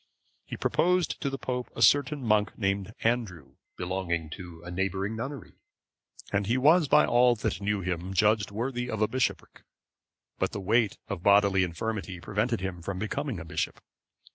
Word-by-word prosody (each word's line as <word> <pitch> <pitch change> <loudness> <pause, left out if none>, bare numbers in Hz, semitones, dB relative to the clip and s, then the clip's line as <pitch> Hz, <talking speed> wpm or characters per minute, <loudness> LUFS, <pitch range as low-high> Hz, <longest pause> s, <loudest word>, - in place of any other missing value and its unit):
He - - -6
proposed 180 -2 +1
to 140 - 0
the 135 - -4
pope 125 -2 -3
a - - +1
certain 145 -1 +4
monk 105 -2 +1
named 100 -1 -1
Andrew, 110 - -1 0.2
belonging 90 -3 -2
to 85 -2 -9
a 85 - -7
neighbouring 95 +3 -2
nunnery(523) 135 +5 -6 0.8
and 100 0 +1
he 120 +4 +2
was 155 +4 +5
by - - +5
all 120 0 +4
that 105 - -3
knew 105 0 0
him 90 0 -3
judged 105 +2 +2
worthy 120 +4 -3
of 110 -2 0
a - - +3
bishopric; 100 -10 -2 0.8
but - - 0
the - - -3
weight 105 +2 +2
of 100 -4 -4
bodily 100 -1 +4
infirmity 95 +1 -4
prevented 105 +4 -1
him 95 -2 -4
from 95 +2 -4
becoming 110 +3 -3
a 80 - -8
bishop. 80 - -3
105 Hz, 165 wpm, -28 LUFS, 95-120 Hz, 0.8 s, was